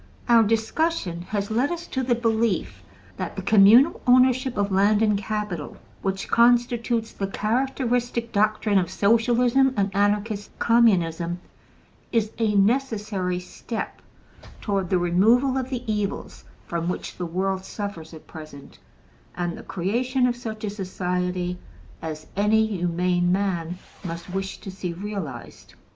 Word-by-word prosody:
Our 235 Hz, -1 st, +6 dB
discussion 225 Hz, -, 0 dB
has 205 Hz, 0 st, -2 dB
led 245 Hz, +6 st, +2 dB
us 345 Hz, 0 st, -4 dB
to 260 Hz, -, -3 dB
the 245 Hz, -1 st, +1 dB
belief 230 Hz, -3 st, 0 dB, 0.4 s
that -, -, -4 dB
the -, -, -5 dB
communal 220 Hz, +9 st, +6 dB
ownership 255 Hz, 0 st, +4 dB
of 200 Hz, 0 st, 0 dB
land 205 Hz, +3 st, +3 dB
and 210 Hz, -1 st, +3 dB
capital, 200 Hz, -5 st, -4 dB, 0.2 s
which 195 Hz, 0 st, -2 dB
constitutes 235 Hz, -1 st, +2 dB
the 195 Hz, -, -3 dB
characteristic 240 Hz, +2 st, -1 dB
doctrine 215 Hz, -1 st, +2 dB
of 175 Hz, -2 st, -2 dB
Socialism 240 Hz, +6 st, +3 dB
and 195 Hz, -1 st, 0 dB
Anarchist 205 Hz, +1 st, 0 dB
Communism, 175 Hz, -7 st, +2 dB, 0.7 s
is 220 Hz, -3 st, +1 dB
a 215 Hz, -2 st, +1 dB
necessary 205 Hz, -5 st, +1 dB
step 215 Hz, +5 st, -6 dB, 0.6 s
toward 195 Hz, -4 st, -1 dB
the 185 Hz, -, +3 dB
removal 220 Hz, +10 st, +3 dB
of 260 Hz, -1 st, -2 dB
the 250 Hz, -2 st, -4 dB
evils 210 Hz, -2 st, -3 dB, 0.2 s
from 170 Hz, 0 st, -2 dB
which 180 Hz, -, -5 dB
the 180 Hz, -, -3 dB
world 190 Hz, +2 st, -1 dB
suffers 195 Hz, -6 st, -6 dB
at 160 Hz, -2 st, -12 dB
present 155 Hz, -4 st, -11 dB, 0.6 s
and 175 Hz, -1 st, -2 dB
the -, -, -9 dB
creation 245 Hz, +8 st, 0 dB
of 245 Hz, -1 st, +1 dB
such 220 Hz, -3 st, -7 dB
a 210 Hz, -, -2 dB
society 180 Hz, -2 st, -2 dB, 0.4 s
as 155 Hz, -1 st, -6 dB
any 215 Hz, +2 st, +3 dB
humane 175 Hz, -2 st, 0 dB
man 180 Hz, -3 st, -1 dB, 0.3 s
must 170 Hz, 0 st, -6 dB
wish 195 Hz, 0 st, -3 dB
to 195 Hz, -, -7 dB
see 185 Hz, -2 st, -5 dB
realized. 180 Hz, -, -7 dB
205 Hz, 135 wpm, -24 LUFS, 180-235 Hz, 0.7 s, Our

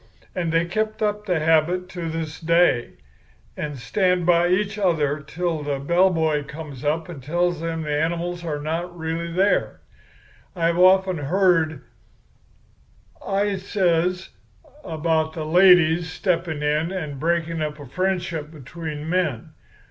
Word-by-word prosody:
And 175 Hz, -4 st, -2 dB
they've 165 Hz, +1 st, +2 dB
kept 215 Hz, +4 st, -2 dB
up 210 Hz, 0 st, -1 dB
the 180 Hz, -3 st, +1 dB
habit 165 Hz, +3 st, +2 dB
to 175 Hz, -3 st, -5 dB
this 160 Hz, -1 st, -5 dB
day, 165 Hz, -7 st, +2 dB, 0.6 s
and 150 Hz, -2 st, -5 dB
stand 180 Hz, -, +1 dB
by 175 Hz, 0 st, +4 dB
each 205 Hz, +4 st, 0 dB
other 155 Hz, -6 st, +1 dB
till 160 Hz, +2 st, -3 dB
the 145 Hz, -1 st, -2 dB
bellboy 160 Hz, -1 st, +2 dB
comes 150 Hz, -3 st, -9 dB
up 155 Hz, +2 st, 0 dB
and 165 Hz, -6 st, -9 dB
tells 175 Hz, +5 st, 0 dB
them 165 Hz, 0 st, -3 dB
the 150 Hz, -1 st, -1 dB
animals 170 Hz, +2 st, -2 dB
are 150 Hz, -3 st, -3 dB
not 170 Hz, +4 st, -4 dB
really 165 Hz, +1 st, -3 dB
there. 190 Hz, +4 st, +1 dB, 0.8 s
I've 170 Hz, 0 st, +1 dB
often 185 Hz, -1 st, +5 dB
heard,' 160 Hz, -2 st, +1 dB, 1.4 s
I 200 Hz, 0 st, 0 dB
says, 180 Hz, -1 st, 0 dB, 0.5 s
'about 160 Hz, -1 st, -1 dB
ladies 170 Hz, 0 st, +4 dB
stepping 165 Hz, -5 st, -1 dB
in 150 Hz, +3 st, 0 dB
and 155 Hz, -7 st, -5 dB
breaking 165 Hz, +1 st, -1 dB
up 150 Hz, 0 st, -3 dB
a 145 Hz, -, -9 dB
friendship 175 Hz, 0 st, -2 dB
between 155 Hz, +1 st, -7 dB
men. 165 Hz, -9 st, -1 dB
165 Hz, 135 wpm, -23 LUFS, 155-180 Hz, 1.4 s, often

